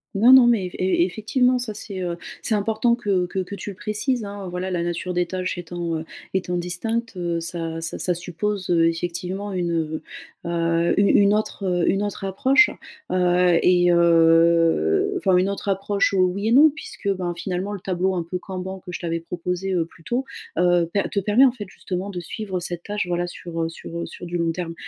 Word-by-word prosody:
Non, 230 +6 +7
non 260 -2 +9
mais 230 -6 +3
eff 180 - -7
e 185 -2 +2
effectivement, 250 +6 +1
ça 240 -3 -4
c'est, 195 -3 -6
heu, 175 -1 -3 0.2
c'est 225 - 0
important 220 +3 +1
que 195 -6 0
que 190 - -3
que 190 +2 -4
tu 205 - -7
le 195 - -8
précises 215 +3 -2
hein, 200 -1 -7
voilà, 180 +1 -3
la 175 -2 -1
nature 175 +1 -3
des 175 0 +1
tâches 185 +1 -3
étant, 170 -1 -3
heu, 160 - -7 0.3
étant 180 -2 -1
distincte, 225 +6 -3
heu, 170 -2 -2
ça 165 -1 -4
ça 165 +1 -4
ça 180 - 0
suppose, 180 +3 -3
heu, 165 -1 +4
effectivement 180 +4 -4
une, 175 -2 -1
heu 160 -1 -2 0.4
heu, 170 0 +1
u 200 - +5
une 200 0 +5
autre, 215 -1 -2
heu, 180 -2 +1
une 195 +1 +1
autre 205 -1 -4
approche, 265 - +4 0.4
heu, 180 -1 +3
et, 175 -1 +4
heu, 170 - +4
enfin, 190 - +3
une 185 +2 +2
autre 200 0 -4
approche, 195 +1 +1
heu, 195 - +1
oui 185 +4 +1
et - - 0
non 290 +6 +8
puisque, 295 -8 -8
ben, 180 -2 -3
finalement, 185 +3 -3
le 205 - -5
tableau 185 +1 -1
un 175 - -1
peu 180 - -2
Kanban 190 0 -6
que 180 - -7
je - - -5
t'avais 165 -1 -2
proposé, 180 +3 -3
heu, 170 -2 +1
plus 165 - -20
tôt, 245 +8 -1 0.3
heu, 175 -1 +3
pe 200 - +1
te 200 - 0
permet 210 +7 +5
en 260 - +5
fait 210 -6 -7
justement 190 +1 -5
de 185 -3 -5
suivre 190 +2 -4
cette 175 -1 -5
tâche, 205 -2 -3
voilà 175 0 -1
sur, 170 -1 -6
heu, 165 - -1
sur, 165 0 -8
heu, - - -3
sur - - -9
du 175 0 -3
long 170 -1 +1
terme. 165 0 -4
180 Hz, 215 wpm, -23 LUFS, 175-205 Hz, 0.4 s, non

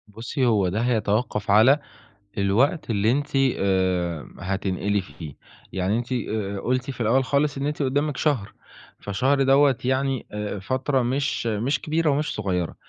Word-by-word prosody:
بُصّي، 120 +6 -3
هو 105 -6 +3
ده 100 +5 -2
هيتوقّف 110 -3 0
على 120 +8 +6 0.6
الوقت 120 - +1
اللي 110 0 +2
أنتِ 145 +3 0 0.3
آآ 90 -5 0
هتنقلي 95 +2 -1
فيه. 75 -3 -10 0.4
يعني 95 +3 0
أنتِ 120 +1 -7
آآ 105 -5 -2
قُلتِ 125 +5 -1
في 130 - -7
الأول 120 +4 +3
خالص 140 +2 0
إن 135 - -2
أنتِ 150 +1 -2
قُدّامِك 145 +1 0
شهر، 130 -10 0 0.5
فشهر 130 +8 +1
دوّة 135 0 +4
يعني 130 0 0
آآ 105 -1 -4
فترة 130 +6 0
مش 130 0 -1
مش 115 +7 0
كبيرة 160 +1 0
ومش 150 +2 0
صغيرة، 90 -5 -2
120 Hz, 150 wpm, -24 LUFS, 100-135 Hz, 0.6 s, على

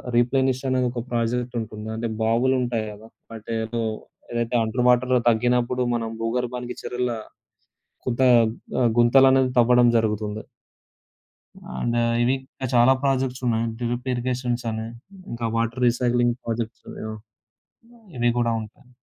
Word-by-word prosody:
రీప్లేనిష్ 130 +2 +2
అనే 130 0 +1
ఒక 120 -1 -4
ప్రాజెక్ట్ 120 +1 -1
ఉంటుంది. 110 -1 -8
అంటే 115 +1 -3
బావులు 120 +4 +2
ఉంటాయి 120 -3 -1
గదా! 105 +2 -13 0.3
అంటే 110 +1 -6
ఏదో 115 +1 -3 0.5
ఏదైతే 120 0 -1
అండర్ 120 +3 -1
వాటర్ 125 +1 +3
తగ్గినప్పుడు 125 +2 +1
మనం 115 -1 -2
భూగర్భానికి 125 +1 -3
చెరుల 125 0 -2 1.0
కొంత 125 +1 0 0.8
గుంతలనేవి 130 +2 +5
తవ్వడం 120 +1 +5
జరుగుతుంది. 105 -1 -2 1.4
అండ్ 120 - 0 0.3
ఇవి 125 +2 +3
ఇంకా 130 0 -7
చాలా 120 +2 +6
ప్రాజెక్ట్స్ 130 -2 0
ఉన్నాయి. 115 0 +1
డ్రిప్ 120 +1 -3
ఇరిగేషన్స్ 125 0 -2
అని. 110 0 -4 0.4
ఇంకా 115 -1 -3
వాటర్ 115 +2 -1
రీసైక్లింగ్ 120 0 +2
ప్రాజెక్ట్స్ 115 -1 -4 1.3
ఇవి 120 0 +2
కూడా 115 -1 +1
ఉంటాయి. 110 +3 -13
120 Hz, 120 wpm, -24 LUFS, 115-125 Hz, 1.4 s, చాలా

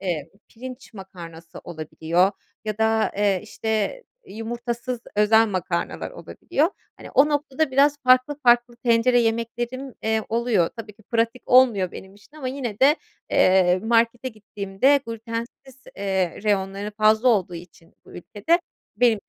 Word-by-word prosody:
eee, 165 -5 -3 0.2
pirinç 255 +1 -10
makarnası 170 -4 -11
olabiliyor 170 +3 0 0.3
ya 215 0 -4
da, 220 0 +2
eee, 200 -2 +2
işte, 220 - -2 0.2
yumurtasız 240 - -5 0.2
özel 220 +2 +5
makarnalar 180 -3 -3
olabiliyor. 325 -1 -2 0.3
Hani, - - -11
o 285 +3 +4
noktada 290 0 -1
biraz 285 +2 +4
farklı 255 +3 +4
farklı 240 0 +3
tencere 240 +1 +4
yemeklerim, 235 +3 -2
eee, 220 0 0
oluyor. 225 -7 +1
Tabii 220 -2 -8
ki 215 +2 -23
pratik 230 +3 -1
olmuyor 235 -8 +4
benim 190 +1 -11
için 205 +9 -20
ama 260 -4 -4
yine 255 -6 -5
de, 290 +4 +6 0.3
eee, 185 -1 +4
markete 230 +2 +1
gittiğimde 210 +4 0
glütensiz, 230 +4 -7
eee, 190 -2 -2
reyonları 200 0 -1
fazla 215 +3 +4
olduğu 190 -6 +1
için 170 -1 -13
bu - - -16
ülkede 215 - 0 0.4
benim 230 -3 +3
225 Hz, 135 wpm, -23 LUFS, 195-250 Hz, 0.4 s, de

